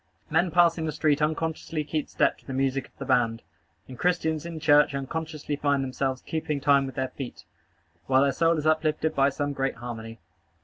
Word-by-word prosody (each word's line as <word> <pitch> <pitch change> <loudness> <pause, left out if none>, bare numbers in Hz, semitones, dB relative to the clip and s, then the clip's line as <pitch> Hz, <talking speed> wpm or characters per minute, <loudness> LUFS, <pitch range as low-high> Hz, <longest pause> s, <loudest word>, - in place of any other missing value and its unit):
Men 170 +3 +3
passing 165 -1 +3
the - - -1
street 150 0 +1
unconsciously 160 0 -1
keep 150 0 -3
step - - +1
to - - -26
the 135 - -4
music 135 0 0
of - - -35
the 135 - -6
band; 120 -3 +1 0.4
and 130 -2 -10
Christians 165 -3 0
in 165 -2 -6
church 150 -2 +4
unconsciously 155 +2 -4
find 140 -1 +1
themselves 130 0 -2
keeping 155 -2 -2
time 140 -1 +3
with 135 - -8
their 130 -2 -1
feet, 135 -3 -8 0.6
while 130 0 +4
their 140 - +3
soul 165 +4 +2
is 150 - -3
uplifted 155 0 +1
by 135 0 +3
some 145 +1 -2
great 135 -1 -1
harmony. 115 -2 -7
145 Hz, 190 wpm, -26 LUFS, 135-160 Hz, 0.6 s, church